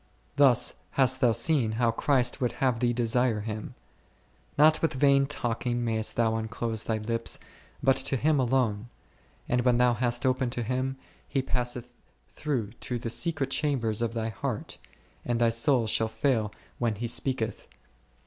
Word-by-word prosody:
Thus 130 Hz, -4 st, +4 dB, 0.2 s
hast 130 Hz, -1 st, +4 dB
thou 120 Hz, -, +5 dB
seen 115 Hz, -1 st, +1 dB
how 115 Hz, +1 st, +2 dB
Christ 125 Hz, +1 st, +1 dB
would 120 Hz, -2 st, 0 dB
have 125 Hz, -2 st, 0 dB
thee 120 Hz, 0 st, +2 dB
desire 120 Hz, -1 st, +1 dB
Him; 110 Hz, 0 st, -6 dB, 0.8 s
not 155 Hz, +2 st, +5 dB
with 160 Hz, -3 st, 0 dB
vain 140 Hz, 0 st, +4 dB
talking 120 Hz, -3 st, -2 dB
mayest 110 Hz, -1 st, 0 dB
thou 110 Hz, -1 st, +1 dB
unclose 110 Hz, 0 st, -2 dB
thy 110 Hz, -, 0 dB
lips, 115 Hz, +2 st, -2 dB, 0.5 s
but 135 Hz, 0 st, +4 dB
to 135 Hz, +1 st, +1 dB
Him 150 Hz, +3 st, +2 dB
alone; 120 Hz, -4 st, 0 dB, 0.6 s
and 125 Hz, 0 st, +1 dB
when 125 Hz, -1 st, +3 dB
thou 125 Hz, 0 st, +4 dB
hast 120 Hz, +2 st, -1 dB
opened 130 Hz, -1 st, +1 dB
to 120 Hz, -, -2 dB
Him, 130 Hz, +3 st, -2 dB, 0.3 s
He 135 Hz, -, -1 dB
passeth 125 Hz, -1 st, -3 dB, 0.4 s
through 125 Hz, -9 st, -3 dB
to 125 Hz, -, -3 dB
the 115 Hz, -1 st, -3 dB
secret 145 Hz, -2 st, -1 dB
chambers 120 Hz, -8 st, 0 dB
of 115 Hz, 0 st, -1 dB
thy 115 Hz, -1 st, -1 dB
heart, 100 Hz, -6 st, -5 dB, 0.4 s
and 120 Hz, -1 st, -1 dB
thy 120 Hz, -1 st, +4 dB
soul 120 Hz, +1 st, +2 dB
shall 110 Hz, +1 st, +1 dB
fail 110 Hz, -1 st, 0 dB, 0.3 s
ivhen 115 Hz, -3 st, +1 dB
He 120 Hz, +2 st, -3 dB
speaketh? 120 Hz, -1 st, -2 dB
120 Hz, 160 wpm, -28 LUFS, 115-130 Hz, 0.8 s, thou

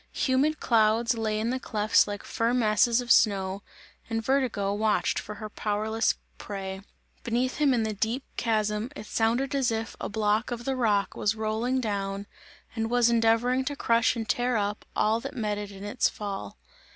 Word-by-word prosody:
Humid 285 Hz, +4 st, +1 dB
clouds 230 Hz, 0 st, +3 dB
lay 215 Hz, -1 st, -1 dB
in 225 Hz, +2 st, 0 dB
the 260 Hz, -, -1 dB
clefts 215 Hz, -3 st, +2 dB
like 205 Hz, -1 st, -5 dB
firm 235 Hz, +2 st, 0 dB
masses 230 Hz, +1 st, +3 dB
of 245 Hz, -, -2 dB
snow 195 Hz, -2 st, +3 dB, 0.5 s
and 225 Hz, -1 st, -2 dB
Vertigo 245 Hz, -7 st, +1 dB
watched 210 Hz, 0 st, +1 dB
for 210 Hz, -, -7 dB
her 215 Hz, +1 st, -6 dB
powerless 215 Hz, +1 st, 0 dB, 0.2 s
prey; 190 Hz, -1 st, -5 dB, 0.4 s
beneath 245 Hz, +2 st, -1 dB
him 295 Hz, -2 st, +3 dB
in 240 Hz, -3 st, +2 dB
the 220 Hz, -1 st, -1 dB
deep 225 Hz, +6 st, -1 dB
chasm 215 Hz, 0 st, 0 dB
it 215 Hz, -, -8 dB
sounded 235 Hz, +6 st, 0 dB
as 270 Hz, -3 st, +2 dB
if 225 Hz, 0 st, -3 dB
a -, -, -3 dB
block 215 Hz, +1 st, +1 dB
of 240 Hz, -1 st, -5 dB
the 270 Hz, -, 0 dB
rock 210 Hz, -5 st, +1 dB
was 210 Hz, +1 st, 0 dB
rolling 220 Hz, +4 st, -1 dB
down 200 Hz, -3 st, -2 dB, 0.5 s
and 225 Hz, -1 st, -1 dB
was 240 Hz, -1 st, +3 dB
endeavouring 235 Hz, +3 st, +3 dB
to 285 Hz, +2 st, -3 dB
crush 230 Hz, -2 st, +2 dB
and 225 Hz, -2 st, -4 dB
tear 245 Hz, +2 st, +1 dB
up 205 Hz, 0 st, -2 dB
all 220 Hz, +2 st, +2 dB
that -, -, -7 dB
met 210 Hz, -3 st, -1 dB
it 205 Hz, -1 st, -6 dB
in 195 Hz, -1 st, -10 dB
its 205 Hz, +4 st, +1 dB
fall. 195 Hz, -, -6 dB
225 Hz, 180 wpm, -27 LUFS, 210-240 Hz, 0.5 s, clouds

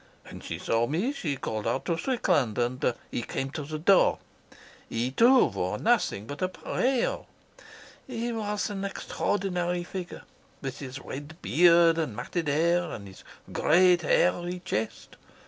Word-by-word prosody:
When -, -, -10 dB
she -, -, -6 dB
saw 115 Hz, +1 st, 0 dB
me 185 Hz, -, 0 dB
she 155 Hz, -, -2 dB
called 110 Hz, -3 st, -3 dB
out 120 Hz, +4 st, -1 dB
to 170 Hz, -, 0 dB
Strickland, 165 Hz, -, +1 dB
and 125 Hz, 0 st, 0 dB, 0.2 s
he -, -, -2 dB
came 135 Hz, +3 st, -4 dB
to 155 Hz, -, -4 dB
the 155 Hz, +2 st, -5 dB
door. 185 Hz, +5 st, +4 dB, 0.7 s
He, 120 Hz, +3 st, -1 dB
too, 245 Hz, -, +6 dB
wore -, -, -2 dB
nothing 215 Hz, -, +1 dB
but 145 Hz, +5 st, -8 dB
a. 240 Hz, +7 st, 0 dB, 0.9 s
He 240 Hz, -2 st, -3 dB
was 210 Hz, -2 st, -2 dB
an 195 Hz, -1 st, -4 dB
extraordinary 180 Hz, -3 st, -2 dB
figure, 180 Hz, 0 st, -7 dB, 0.4 s
with 135 Hz, 0 st, -6 dB
his 135 Hz, -1 st, -7 dB
red 145 Hz, +4 st, -8 dB
beard 170 Hz, 0 st, +5 dB
and 150 Hz, -10 st, -2 dB
matted 170 Hz, +8 st, -3 dB
hair, 170 Hz, +4 st, +2 dB
and 100 Hz, -2 st, -7 dB
his 95 Hz, -, -13 dB, 0.3 s
great 175 Hz, +2 st, +4 dB
hairy 175 Hz, +3 st, +1 dB
chest. 110 Hz, -, -4 dB
170 Hz, 145 wpm, -27 LUFS, 135-190 Hz, 0.9 s, too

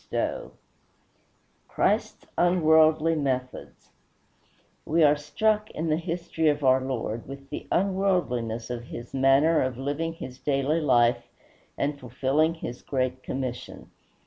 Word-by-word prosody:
XIII -, -, -2 dB, 1.2 s
CHRIST'S -, -, 0 dB
UNWORLDLY 160 Hz, -2 st, +4 dB
METHODS 130 Hz, -3 st, -4 dB, 0.9 s
We 165 Hz, +1 st, +2 dB
are 150 Hz, 0 st, +6 dB
struck, 215 Hz, +8 st, 0 dB
in 160 Hz, +1 st, -3 dB
the 155 Hz, -, +2 dB
history 165 Hz, -1 st, -2 dB
of 145 Hz, 0 st, -1 dB
our 130 Hz, 0 st, +4 dB
Lord, 120 Hz, -3 st, -4 dB
with 135 Hz, 0 st, -10 dB
the -, -, -6 dB
unworldliness 170 Hz, -, 0 dB
of 120 Hz, -1 st, -5 dB
his 120 Hz, 0 st, -9 dB
manner 135 Hz, +4 st, +4 dB
of 130 Hz, -2 st, -2 dB
living 145 Hz, +5 st, -2 dB
his 130 Hz, -5 st, -9 dB
daily 145 Hz, +3 st, 0 dB
life 120 Hz, -4 st, +3 dB, 0.5 s
and 145 Hz, 0 st, -1 dB
fulfilling 135 Hz, +6 st, 0 dB
his 125 Hz, -6 st, -7 dB
great 130 Hz, -1 st, -2 dB
commission. 130 Hz, -2 st, -6 dB
140 Hz, 120 wpm, -26 LUFS, 130-165 Hz, 1.2 s, are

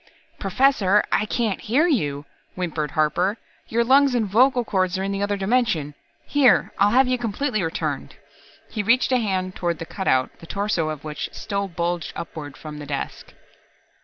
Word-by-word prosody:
"Professor, 210 Hz, -2 st, +3 dB
I 210 Hz, -, +2 dB
can't 220 Hz, -3 st, -1 dB
hear 270 Hz, +10 st, +2 dB
you," 145 Hz, -, 0 dB, 0.3 s
whimpered 165 Hz, -4 st, -2 dB
Harper. 175 Hz, +7 st, +2 dB, 0.3 s
"Your 235 Hz, +1 st, +1 dB
lungs 270 Hz, +1 st, +4 dB
and 230 Hz, -3 st, +2 dB
vocal 245 Hz, +5 st, +3 dB
cords 185 Hz, -2 st, 0 dB
are 190 Hz, -, -2 dB
in 195 Hz, -, -2 dB
the 200 Hz, 0 st, -2 dB
other 205 Hz, 0 st, 0 dB
dimension. 195 Hz, -, 0 dB, 0.3 s
Here, 285 Hz, -4 st, +4 dB
I'll 200 Hz, +1 st, +5 dB
have 255 Hz, +4 st, +4 dB
you 255 Hz, -1 st, 0 dB
completely 235 Hz, 0 st, -1 dB
returned." 165 Hz, -1 st, -3 dB, 0.6 s
He 215 Hz, -, -2 dB
reached 240 Hz, +6 st, +3 dB
a 255 Hz, -, +4 dB
hand 185 Hz, -4 st, -2 dB
toward 170 Hz, -2 st, -1 dB
the 165 Hz, -, -6 dB
cutout, 130 Hz, -9 st, 0 dB
the 165 Hz, -, -12 dB
torso 200 Hz, -5 st, -1 dB
of 155 Hz, -2 st, -6 dB
which 150 Hz, -1 st, -5 dB
still 200 Hz, -1 st, -3 dB
bulged 170 Hz, -1 st, -3 dB
upward 145 Hz, -5 st, -7 dB
from 150 Hz, 0 st, -8 dB
the 145 Hz, -, -8 dB
desk. 140 Hz, -1 st, -5 dB
195 Hz, 170 wpm, -23 LUFS, 165-235 Hz, 0.6 s, I'll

